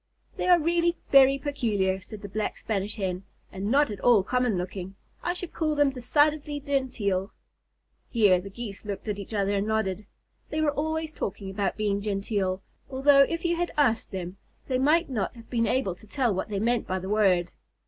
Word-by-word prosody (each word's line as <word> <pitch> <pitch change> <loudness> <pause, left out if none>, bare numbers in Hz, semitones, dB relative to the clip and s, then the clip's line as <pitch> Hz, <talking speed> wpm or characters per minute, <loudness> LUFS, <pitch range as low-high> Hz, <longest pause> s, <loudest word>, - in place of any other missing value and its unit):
"They - - -2
are 355 -1 +7
really 340 +2 +2
very 275 0 +7
peculiar," 215 -10 -1
said 210 +2 -10
the - - -5
Black 210 +2 -3
Spanish 205 -1 -2
Hen, 185 -4 -2 0.3
"and 195 +2 -4
not 280 0 +3
at 205 - -6
all 230 -6 +5
common 250 -2 +1
looking. 185 +1 -5 0.3
I 350 - -1
should 360 -1 -4
call 310 -2 0
them 290 -2 +3
decidedly 290 +3 +1
genteel." 250 -9 -1 0.8
Here 205 -6 +4
the 200 - -8
Geese 205 -1 -8
looked 205 0 -6
at 205 -1 -2
each 200 - -8
other 200 -2 0
and 200 +1 0
nodded. 210 -2 -1 0.4
They 310 - -2
were 310 -1 +2
always 315 +2 -2
talking 195 -5 -4
about 195 +1 -1
being 205 -2 0
genteel, 195 -2 -1 0.3
although 275 +1 +5
if 335 +5 +1
you 340 0 +2
had 350 0 -2
asked 245 -6 +2
them, 185 -1 -6 0.3
they 255 -2 0
might 310 +6 +3
not 225 -4 -2
have 230 -1 -14
been 230 -2 +1
able 215 -5 0
to 215 +5 -17
tell 245 -1 +1
what 190 +3 -3
they 205 - -2
meant 235 +2 0
by 185 - -1
the 185 0 -5
word. 190 -4 +2
220 Hz, 195 wpm, -27 LUFS, 195-280 Hz, 0.8 s, are